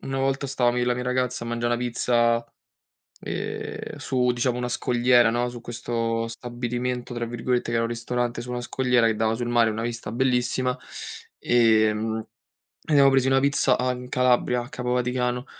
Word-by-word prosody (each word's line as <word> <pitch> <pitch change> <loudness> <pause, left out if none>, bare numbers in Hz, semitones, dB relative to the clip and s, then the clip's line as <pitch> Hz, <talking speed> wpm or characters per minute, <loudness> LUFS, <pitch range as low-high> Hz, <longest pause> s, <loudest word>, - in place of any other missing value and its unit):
una 135 0 -3
volta 135 +1 0
stavamo 125 -2 +1
io - - +1
e 120 - 0
la 125 - +2
mia 125 0 -4
ragazza 125 -1 -1
a - - -6
mangià 120 0 -1
'na 120 - +1
pizza, 120 -1 +1 0.8
ehm, - - -5
su, 125 -1 +1
diciamo, 120 0 0
una 125 0 -2
scogliera, 120 -1 +3
no, 120 +2 0
su 120 -1 -9
questo 115 -1 -2
"stabilimento", 120 +1 -4
tra 120 0 -3
virgolette 120 +1 -1
che - - -2
era 115 0 +2
un 115 - 0
ristorante 120 +1 -2
su 125 - -9
una 125 0 -3
scogliera 125 -1 +1
che 110 - +2
dava 110 +1 +1
sul 120 +1 -3
mare, 120 -1 +3
una 110 +1 -3
vista 115 -2 -4
bellissima. 125 0 +1 0.7
Ehm, 110 -1 +2 0.7
siamo 140 -1 +7
presi 135 -1 +3
una 135 0 +4
pizza 140 -2 +2
a 125 0 0
in 125 0 -7
Calabria, 125 -1 +2
a 120 - -10
Capo 125 -2 -4
Vaticano. 125 0 -1
120 Hz, 185 wpm, -25 LUFS, 120-125 Hz, 0.8 s, siamo